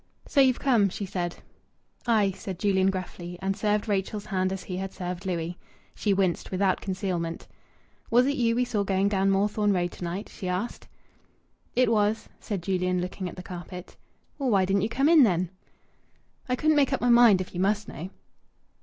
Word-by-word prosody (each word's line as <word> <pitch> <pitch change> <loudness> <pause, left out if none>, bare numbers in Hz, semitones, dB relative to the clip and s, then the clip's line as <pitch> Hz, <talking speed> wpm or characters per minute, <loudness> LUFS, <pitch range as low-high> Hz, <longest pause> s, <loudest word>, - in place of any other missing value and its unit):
"So 280 - +4
you've 260 -2 +4
come," 230 -7 +3
she 200 +2 -5
said. 175 -2 -3 0.7
"Aye!" 215 -4 +3
said 190 -1 -6
Julian 190 -1 +2
gruffly, 180 -2 -5
and 195 0 -1
served 210 +1 0
Rachel's 205 +1 -1
hand 185 -2 0
as 190 -1 -4
he 180 - -5
had 190 0 -4
served 180 +1 -5
Louis'. 175 -1 -3 0.3
She 210 - -1
winced 190 -3 +1
without 190 0 +1
concealment. 185 -3 -3 0.6
"Was 245 +2 +5
it 280 +1 +1
you 230 -3 +2
we 250 +1 +2
saw 215 -4 -1
going 195 0 +1
down 195 -1 +2
Moorthorne 205 +1 +2
Road 175 -2 0
to - - -9
night?" 175 +4 -4
she 185 - -7
asked. 185 +6 -3 0.9
"It 250 -2 +3
was," 210 0 +1
said 195 -5 -4
Julian, 180 -1 0
looking 180 +1 -4
at - - -10
the 180 - -8
carpet. 180 0 -8 0.4
"Well, 270 -2 0
why 195 -4 +4
didn't 195 +1 +1
you 215 - 0
come 270 +5 +2
in 325 -2 +7
then?" 180 -6 +2 1.0
"I 250 - +2
couldn't 310 +3 +2
make 280 -2 +3
up - - -1
my 245 - +2
mind, 235 -5 +7
if 185 - -5
you 175 - -4
must 205 +2 +1
know." 170 +6 -7
195 Hz, 190 wpm, -27 LUFS, 185-215 Hz, 1.0 s, in